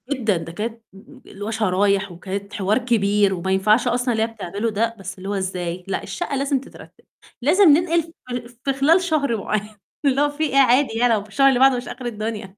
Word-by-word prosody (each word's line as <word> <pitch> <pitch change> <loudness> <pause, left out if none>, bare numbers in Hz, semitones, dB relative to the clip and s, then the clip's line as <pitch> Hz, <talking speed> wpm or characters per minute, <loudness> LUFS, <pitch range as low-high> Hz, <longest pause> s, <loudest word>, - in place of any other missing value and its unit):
جدًا، 230 -9 0
ده 165 0 -7
كانت 225 +6 -5 0.4
اللي 205 +1 -9
هو 220 - -3
شرايح 200 -2 +1
وكانت 195 +3 -6
حوار 205 0 +1
كبير 210 -5 +2
وما 190 +1 -3
ينفعش 210 +5 +3
أصلًا 245 +1 0
اللي 220 0 +1
هي - - 0
بتعملُه 215 0 -4
ده، 225 +2 -1
بس 190 -1 -7
اللي 190 +1 -7
هو - - -1
إزاي 180 -2 -3
"لأ 195 - -3
الشقة 350 -5 -4
لازم 275 0 0
تترتب، 270 - -15 0.4
لازم 325 +11 +4
ننقل 335 +3 +4
ف 305 -6 -12 0.4
في - - +3
خلال 300 +7 +4
شهر 290 -9 0
معيّن." 210 +1 -3 0.3
اللي 275 0 +3
هو 290 - +3
في 290 +2 -3
إيه، 285 -3 0
عادي 260 -2 +4
يع 245 +2 +3
لو 225 -3 +2
في 210 - -17
الشهر 275 +5 +3
اللي 255 -2 +2
بعده 265 -1 +5
مش 245 - -6
آخر 250 0 -8
الدنيا. 215 -4 -5
225 Hz, 215 wpm, -21 LUFS, 200-270 Hz, 0.4 s, بعده